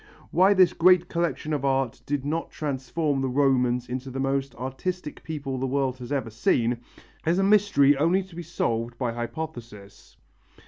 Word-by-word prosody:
Why 190 +4 +5
this 185 -2 +5
great 180 0 +4
collection 170 -2 -1
of 145 -2 -1
art 135 -3 0
did 140 -1 -2
not 160 +3 -2
transform 145 0 -2
the 135 - 0
Romans 125 -2 +2
into 130 +2 -5
the 130 +1 -5
most 135 -1 -1
artistic 150 +7 -5
people 140 -5 -4
the 135 - -1
world 130 -1 -1
has 125 +2 -8
ever 135 -5 -2
seen, 115 +1 +1 0.4
is 170 +2 +1
a 195 - +2
mystery 195 -9 +4
only 170 +7 +2
to 185 -2 -15
be 175 - -5
solved 120 -8 -2
by 120 -2 -1
hypothesis. 120 -5 -7
135 Hz, 170 wpm, -26 LUFS, 125-165 Hz, 0.4 s, Why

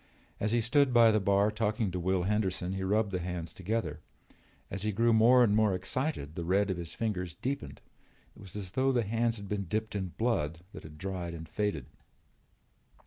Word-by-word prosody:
As 105 - 0
he 120 0 +3
stood 130 +2 +3
by 115 -1 +7
the 110 - +3
bar 100 +1 +3
talking 105 -1 -1
to 90 - -3
Will 95 +1 +1
Henderson 95 -2 0
he 95 - -3
rubbed 105 +2 +1
the 90 - -1
hands 90 -2 -5
together. 110 +5 -2 0.7
As 100 - -4
he 105 +1 0
grew 115 +3 +3
more 120 +3 +6
and 105 -3 +3
more 105 -3 +3
excited 95 - -2
the 85 - -4
red 95 +3 +2
of 95 - -2
his 85 -1 -6
fingers 90 -6 -2
deepened. 80 - -4 0.5
It - - -17
was 95 -2 -12
as 95 -3 -5
though 135 +4 +2
the 120 -3 +2
hands 115 +2 0
had 100 -1 -8
been 100 -1 -2
dipped 110 +5 -2
in 95 -2 -1
blood 85 -9 0
that - - -8
had 75 -1 -12
dried 90 -2 -4
and 80 0 -8
faded. 100 - -2
100 Hz, 200 wpm, -30 LUFS, 90-110 Hz, 0.7 s, by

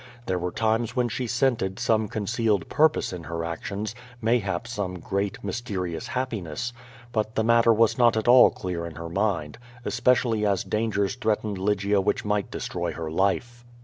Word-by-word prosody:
There 95 -1 -1
were 90 +1 -2
times 110 +3 0
when 125 -1 +1
she 120 +2 -3
scented 120 -6 +1
some 110 -1 +1
concealed 105 -2 0
purpose 155 -9 +2
in 85 -2 -7
her 85 +2 -3
actions, 100 +6 -4 0.3
mayhap 110 -3 0
some 100 -6 -3
great, 100 +2 -2
mysterious 95 -5 -3
happiness; 120 -4 -3 0.4
but 110 -1 -1
the 110 - +2
matter 115 0 +5
was 115 +2 +3
not 120 -2 +5
at 110 - -1
all 125 +1 +8
clear 85 -2 -4
in 80 - -9
her 85 +1 -6
mind, 90 -3 -1 0.3
especially 120 -3 +2
as 100 -3 +1
dangers 105 -3 0
threatened 110 -4 -1
Lygia 100 0 +1
which 95 - 0
might 105 -1 0
destroy 85 -1 -3
her 80 -1 -5
life. 120 +7 0
105 Hz, 165 wpm, -26 LUFS, 95-115 Hz, 0.4 s, all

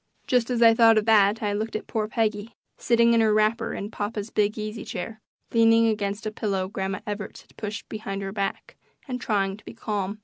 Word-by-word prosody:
Just 245 -2 +1
as 240 -2 +2
I 230 0 +8
thought 225 -1 +6
of 215 - +2
that 215 -1 +4
I 205 -1 0
looked 215 +2 -3
at 215 - -3
poor 215 -2 -2
Peggy, 215 0 -2 0.2
sitting 235 0 +3
in 230 - +4
her 220 -1 +3
wrapper 215 +2 +1
in 205 +2 -5
papa's 210 0 -4
big 210 +1 +1
easy 215 0 -5
chair, 215 +5 -6 0.3
leaning 230 0 +5
against 205 -1 -2
a 215 - -2
pillow 195 -3 -2
Grandma 190 0 -4
Evarts 210 -1 -6
had - - -26
put 210 0 -5
behind 200 -2 -5
her 195 - -4
back, 195 -1 -4 0.3
and 250 -2 -4
trying 195 -2 0
to - - -19
be - - -10
calm. 210 -2 -3
215 Hz, 210 wpm, -25 LUFS, 205-225 Hz, 0.3 s, I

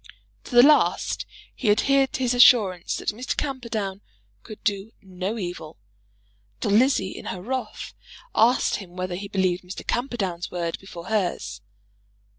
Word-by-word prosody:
To 245 - -7
the 240 - +9
last, 300 +2 +3 0.3
he 235 - -1
adhered 270 +5 +3
to 260 - -2
his 250 -1 +2
assurance 215 -8 +5
that - - -2
Mr. 240 +5 -3
Camperdown 230 -8 -3 0.4
could 215 - -12
do 205 -1 -2
no 190 +2 -5
evil; 175 - -6 0.8
till - - -1
Lizzie, 220 -3 +3
in - - -9
her 185 - -4
wrath, 255 +7 -5 0.4
asked 240 +3 +3
him 180 -3 -11
whether 185 0 -3
he 195 +3 -5
believed 185 -3 0
Mr. 180 +2 -8
Camperdown's 205 -9 -2
word 170 -2 -3
before 175 -3 -10
hers. 175 - -2
200 Hz, 145 wpm, -24 LUFS, 180-240 Hz, 0.8 s, the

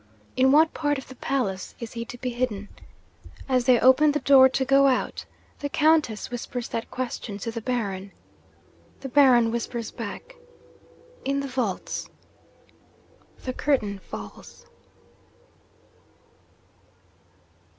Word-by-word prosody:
In 260 +1 +4
what 310 +3 +5
part 290 -2 0
of 265 - -9
the 260 - -10
palace 230 -9 -2
is 230 -2 -7
he 230 -1 -5
to 245 - -9
be 250 +1 -3
hidden? 235 -5 -3 0.8
As 255 -2 +1
they 250 -2 +5
open 290 +4 +5
the 295 - 0
door 265 -2 +7
to 265 0 -1
go 275 +1 +5
out, 255 -2 -1 0.3
the 285 - -3
Countess 305 -9 +2
whispers 245 0 -5
that 230 - -4
question 240 -4 -5
to 230 +3 -4
the 230 0 -5
Baron. 200 -5 -3 0.9
The 270 - -6
Baron 245 -4 +5
whispers 235 0 -4
back, 240 - -7 0.9
"In 275 +1 0
the 280 - -3
vaults!" 250 -8 -3 1.3
The 255 - -3
curtain 215 -9 0
falls.' 105 - -10
250 Hz, 125 wpm, -25 LUFS, 230-275 Hz, 1.3 s, door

